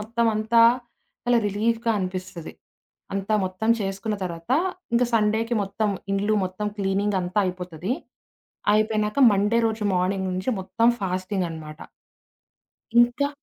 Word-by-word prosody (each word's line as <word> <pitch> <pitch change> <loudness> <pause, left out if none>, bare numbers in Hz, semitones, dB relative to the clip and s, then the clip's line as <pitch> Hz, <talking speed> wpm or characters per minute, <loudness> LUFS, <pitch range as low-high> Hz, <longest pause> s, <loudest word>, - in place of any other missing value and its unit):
మొత్తం 230 +2 0
అంతా 220 +2 +3 0.6
చాలా 245 -1 +3
రిలీఫ్‌గా 225 +3 0
అనిపిస్తది. 185 -2 -5 0.6
అంతా 195 +2 -1
మొత్తం 185 +4 -1
చేసుకున్న 195 +2 -2
తర్వాత 170 +4 -4 0.4
ఇంక 235 - +3
సండేకి 220 +2 +1
మొత్తం 200 +2 -1 0.2
ఇండ్లు 205 +2 +1
మొత్తం 185 +3 -4
క్లీనింగ్ 200 0 0
అంతా 180 +3 -2
అయిపోతది. 180 +2 -4 0.8
అయిపోయినాక 215 +1 +1
మండే 205 +3 +2
రోజు 220 -1 -2
మార్నింగ్ 185 +1 0
నుంచి 185 +7 -2
మొత్తం 195 +5 +1
ఫాస్టింగనమాట. 180 -5 -3 1.2
ఇంకా 245 +4 +2
200 Hz, 110 wpm, -24 LUFS, 185-220 Hz, 1.2 s, అంతా